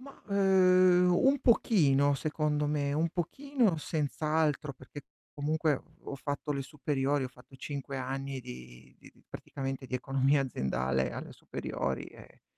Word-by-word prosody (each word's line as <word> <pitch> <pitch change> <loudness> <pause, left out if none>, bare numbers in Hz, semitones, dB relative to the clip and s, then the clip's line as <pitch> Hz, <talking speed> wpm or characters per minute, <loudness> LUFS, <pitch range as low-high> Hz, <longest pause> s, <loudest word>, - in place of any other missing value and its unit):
Ma, 275 +1 -12
uhm, 185 -2 +5
un 275 +2 +5
pochino, 145 - +4
secondo 150 +1 -1
me, 145 -1 0
un 160 +3 +1
pochino 220 - 0
senz'altro, 150 -1 -1
perché 130 +2 -11 0.3
comunque 150 0 0 0.2
ho - - -6
fatto 145 +2 -3
le 140 - -2
superiori, 140 0 -1
ho - - -4
fatto 125 +1 -17
5 140 0 -5
anni 135 +1 -4
di 65 - -11
di - - -16
di - - -26
praticamente 135 -1 -6
di 130 - -6
economia 135 +2 +2
aziendale 65 - -1
alle - - -7
superiori 65 -1 -4
e - - -15
145 Hz, 140 wpm, -30 LUFS, 135-160 Hz, 0.3 s, uhm